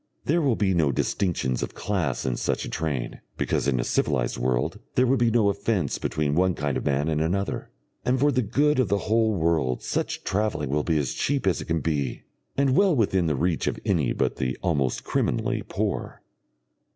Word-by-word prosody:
There 170 +4 +2
will 135 -6 +2
be 95 -3 +1
no 80 -5 +2
distinctions 70 -4 -1
of - - -4
class 90 -11 -1
in 65 -2 0
such - - -1
a - - -6
train, 75 -6 -3 0.2
because - - 0
in 65 -3 +1
a - - +1
civilised 65 -3 0
world 60 0 -1 0.2
there 125 - +4
would 130 +1 +2
be 120 -1 +4
no 115 -2 +3
offence 100 - -1
between 75 -2 -1
one 90 +2 +2
kind 70 -2 -1
of - - -2
man 70 +2 +1
and 80 -1 0
another, 95 +5 -1 0.3
and 125 +1 +1
for 145 +2 +4
the 130 -1 +2
good 140 +6 +2
of 130 - +3
the 100 +2 +2
whole 110 0 +2
world 80 -7 +1
such - - -2
travelling 95 -9 -1
will 75 +1 +2
be 80 0 +1
as 70 -4 -1
cheap 140 -4 -1
as 95 -3 +1
it - - -6
can 80 -1 -1
be, 75 -3 -2 0.3
and 135 -1 +3
well 195 -2 +4
within 95 -7 +2
the 75 - +1
reach 85 +3 0
of - - -1
any 85 - +1
but - - -1
the 65 0 -2
almost 70 -8 0
criminally - - 0
poor. - - -3
85 Hz, 205 wpm, -25 LUFS, 70-110 Hz, 0.3 s, there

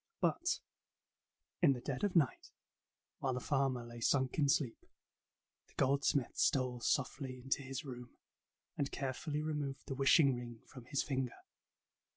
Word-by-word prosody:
But 345 0 +1 1.0
in 155 -6 +6
the 125 - -5
dead 130 +4 -4
of 205 -3 +1
night, 150 -7 +2 0.7
while 130 -2 0
the - - -1
farmer 135 -3 0
lay 120 0 -9
sunk 130 +4 +2
in 140 -2 +4
sleep, 135 -4 +1 0.8
the - - -25
goldsmith 135 -1 +2
stole 125 -2 +2
softly 130 +1 -1
into 135 +2 -1
his 135 +3 -5
room, 125 -2 -7 0.7
and 140 - -1
carefully 145 +3 -2
removed 145 -3 -3
the - - -4
wishing 135 +1 +5
ring 120 -2 -7
from 125 -2 -12
his 140 +2 0
finger. 130 -4 -2
135 Hz, 145 wpm, -36 LUFS, 125-140 Hz, 1.0 s, in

